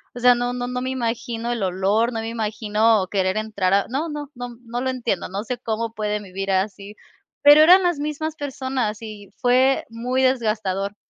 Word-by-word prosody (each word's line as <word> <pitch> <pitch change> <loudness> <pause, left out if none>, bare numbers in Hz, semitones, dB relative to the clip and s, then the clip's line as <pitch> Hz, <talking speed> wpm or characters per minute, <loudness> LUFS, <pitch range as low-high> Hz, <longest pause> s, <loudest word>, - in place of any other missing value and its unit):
O 245 - -6
sea, 245 0 +6
no 245 0 -2
no 245 0 -3
no 250 0 -3
me 255 - -2
imagino 235 -2 -3
el 235 -3 -2
olor, 195 +6 +1
no 225 - -2
me 225 - -4
imagino 215 -2 +1
querer 190 -1 +1
entrar 200 -4 -1
a 200 - +3
no 280 +7 -2
no 295 -1 -6
no 245 -1 -7
no 240 +2 -4
lo 260 - -1
entiendo, 240 -7 -2
no 195 +3 -4
sé 245 +1 -4
cómo 225 -1 -3
pueden 210 -1 -2
vivir 195 +1 -5
así, 200 +2 -2 0.5
pero 290 +1 +9
eran 365 +4 +7
las 350 -5 +1
mismas 305 +1 -3
personas 260 -6 -3
y 210 -2 -9
fue 260 +1 +3
muy 245 +3 -2
desgastador. 215 -6 0
230 Hz, 195 wpm, -22 LUFS, 210-255 Hz, 0.5 s, pero